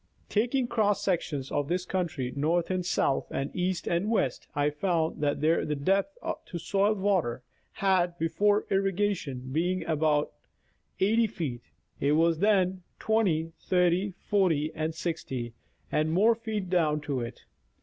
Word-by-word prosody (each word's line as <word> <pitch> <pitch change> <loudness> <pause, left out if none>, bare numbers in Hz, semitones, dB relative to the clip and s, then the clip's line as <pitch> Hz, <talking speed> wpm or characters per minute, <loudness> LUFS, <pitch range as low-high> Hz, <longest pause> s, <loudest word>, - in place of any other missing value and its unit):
Taking 245 +5 +1
cross 210 -4 +1
sec 180 -4 +2
tions 140 -4 -5
of 145 -1 0
this 180 +2 -1
country, 155 -10 -2
north 165 +5 +1
and 185 -1 0
south 140 -5 +1
and 135 +1 -3
east 180 0 -1
and 175 +5 0
west, 140 - 0
I 145 0 +2
found 160 0 -1
that 145 -1 +1
where 160 +2 +3
the 150 - -1
depth 195 - 0 0.3
to 175 - -5
soil 195 +5 +1
water 185 - 0 0.3
had, 180 -3 +1
before 205 +6 +2
irrigation, 195 -9 -1
been 175 +5 0
about 155 -2 +1 0.7
80 225 +4 +3
feet, 140 - -4 0.4
it 145 +1 +2
was 165 +1 +3
then 190 -2 +2 0.2
20, 180 -8 +1
30, 180 +1 +1
40 165 -7 +1
or 155 0 -2
60 145 -8 -4 0.4
and 155 +1 +1
more 210 +7 +5
feet 220 -4 -4
down 160 -4 +2
to 145 -3 -2
it. 115 -1 -7
175 Hz, 150 wpm, -28 LUFS, 150-195 Hz, 0.7 s, more